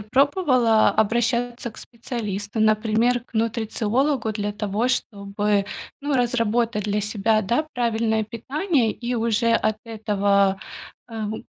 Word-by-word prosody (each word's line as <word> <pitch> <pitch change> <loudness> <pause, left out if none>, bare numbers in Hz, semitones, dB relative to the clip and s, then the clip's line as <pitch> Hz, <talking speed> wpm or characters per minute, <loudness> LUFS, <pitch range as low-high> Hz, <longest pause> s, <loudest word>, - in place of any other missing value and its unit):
пробовала 255 - +3
обращаться 235 +3 0
к - - -19
специалисту, 220 -3 -5
например, 220 +3 +2
к - - -30
нутрициологу, 230 +3 0
для 205 -1 -3
того 210 +3 -1
чтобы, 205 -4 -1 0.3
ну, 285 0 -1
разработать 235 -3 +1
для 210 0 0
себя, 215 +1 +1
да, 240 +10 0
правильное 225 -2 0
питание 255 - 0
и 245 +2 -4
уже 230 0 +1
от 215 -2 +1
этого, 200 -3 +1 0.5
эм, 220 -1 -4
225 Hz, 115 wpm, -23 LUFS, 210-240 Hz, 0.5 s, пробовала